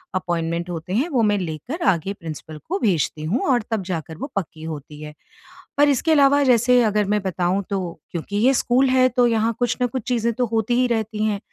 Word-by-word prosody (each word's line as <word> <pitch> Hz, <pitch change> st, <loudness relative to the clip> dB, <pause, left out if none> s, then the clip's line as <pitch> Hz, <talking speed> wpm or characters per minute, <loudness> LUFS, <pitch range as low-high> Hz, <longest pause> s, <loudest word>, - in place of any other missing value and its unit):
Appointment 170 Hz, -1 st, -2 dB
होते 175 Hz, +1 st, -5 dB
हैं, 260 Hz, +9 st, +1 dB
वो 260 Hz, -7 st, +1 dB
मैं 205 Hz, -1 st, +2 dB
लेकर 180 Hz, -, -5 dB
आगे 190 Hz, +1 st, +1 dB
प्रिंसिपल 160 Hz, -4 st, -8 dB
को 385 Hz, +3 st, -1 dB
भेजती 165 Hz, -, 0 dB
हूँ 190 Hz, +12 st, 0 dB
और 240 Hz, -3 st, +2 dB
तब 220 Hz, -3 st, -1 dB
जाकर 165 Hz, -3 st, -5 dB
वो 275 Hz, -, -5 dB
पक्की 160 Hz, -5 st, -4 dB
होती 150 Hz, -1 st, -8 dB
है। 150 Hz, 0 st, -8 dB, 0.6 s
पर 290 Hz, 0 st, +5 dB
इसके 285 Hz, +4 st, +1 dB
अलावा 285 Hz, -1 st, +5 dB
जैसे 250 Hz, -1 st, +4 dB
अगर 210 Hz, -1 st, +1 dB
मैं 210 Hz, -, +1 dB
बताऊँ, 190 Hz, +1 st, -1 dB
तो 185 Hz, -4 st, -3 dB
क्योंकि 180 Hz, +4 st, -4 dB
ये 255 Hz, +5 st, +4 dB
स्कूल 255 Hz, +1 st, +2 dB
है, 255 Hz, 0 st, +4 dB
तो 245 Hz, -1 st, +3 dB
यहाँ 230 Hz, 0 st, +1 dB
कुछ 245 Hz, -1 st, 0 dB
न 245 Hz, -, +3 dB
कुछ 250 Hz, 0 st, -5 dB
चीज़ें 235 Hz, -2 st, +1 dB
तो 245 Hz, +2 st, 0 dB
होती 225 Hz, +1 st, 0 dB
ही -, -, +3 dB
रहती 220 Hz, -2 st, -2 dB
हैं। 210 Hz, -2 st, 0 dB
210 Hz, 215 wpm, -22 LUFS, 175-245 Hz, 0.6 s, पर